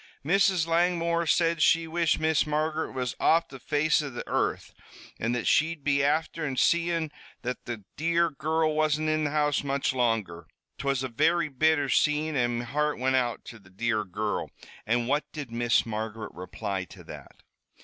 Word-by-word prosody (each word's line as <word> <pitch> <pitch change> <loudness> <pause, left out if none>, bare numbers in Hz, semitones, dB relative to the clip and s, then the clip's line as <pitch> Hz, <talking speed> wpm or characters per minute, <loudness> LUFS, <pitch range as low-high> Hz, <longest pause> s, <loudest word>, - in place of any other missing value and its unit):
"Mrs. 190 0 +3
Langmore 170 0 +1
said 165 -1 +2
she 165 +2 +4
wished 165 0 +1
Miss 160 -1 +2
Margaret 155 +1 -1
was 125 -2 -3
off 165 +1 +3
the 135 - -10
face 150 +4 +1
of 140 -4 -6
the - - -6
earth, - - -1 0.5
an' 115 +2 -1
that 120 -2 -2
she'd 160 0 +2
be 140 -1 +2
afther 150 0 0
seein' 170 +2 +1 0.3
that 125 0 -4
the 115 -4 -6
dear 170 +1 +2
girrul 155 +2 0
wasn't 155 0 +1
in 155 0 +1
the - - 0
house 150 -1 +1
much 140 -1 0
longer. 110 -10 -1 0.3
'Twas 135 -1 0
a - - -1
very 155 +6 +1
bitter 150 +1 +2
scene, 150 +3 +1
an' 120 -2 +1
me 120 - -4
heart 150 +4 -1
wint 130 +1 +1
out 120 -3 -1
to 115 - -10
the 95 -2 -20
dear 110 +3 -1
girrul 105 +2 -3 0.2
" - - -20
"And 120 +1 +1
what 145 +3 -1
did 145 -6 -7
Miss 120 0 +2
Margaret 110 0 -5
reply 95 +2 -4
to - - -14
that?" - - -12
145 Hz, 180 wpm, -27 LUFS, 120-160 Hz, 0.5 s, she